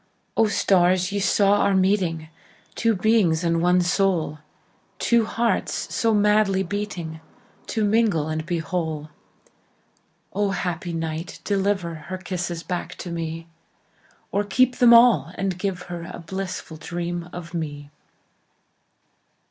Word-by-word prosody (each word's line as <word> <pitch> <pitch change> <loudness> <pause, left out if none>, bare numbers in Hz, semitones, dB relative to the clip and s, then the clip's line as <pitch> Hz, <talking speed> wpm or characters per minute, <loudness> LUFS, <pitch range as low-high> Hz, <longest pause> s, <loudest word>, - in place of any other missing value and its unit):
O, 225 - +4
stars, 185 -2 +2
ye 200 - -1
saw 200 +1 +3
our 200 - +3
meeting, 185 -4 +1 0.5
Two 230 -2 +1
beings 185 -5 +2
and 165 -1 +1
one 180 +1 +4
soul, 175 -4 +1 0.6
Two 235 -2 +3
hearts 230 +2 -1
so 230 - +2
madly 210 -2 +3
beatingTo 205 +3 -5
mingle 205 -8 +2
and 155 0 -2
be 170 +1 -2
whole!O, 160 +4 -6
happy 175 -3 -3
night, 165 0 -4
deliverHer 185 -3 -2
kisses 175 -2 -3
back 180 0 -4
to 175 - -7
me, 165 0 -4 0.9
Or 200 - +1
keep 250 +5 +2
them 245 -1 +6
all, 235 -7 +6
and 190 -2 -2
give 185 -2 -2
herA 175 -1 -7
blissful 185 -3 -5
dream 175 +1 -4
of 170 -1 -8
me! 145 -3 -5
180 Hz, 115 wpm, -23 LUFS, 165-205 Hz, 0.9 s, them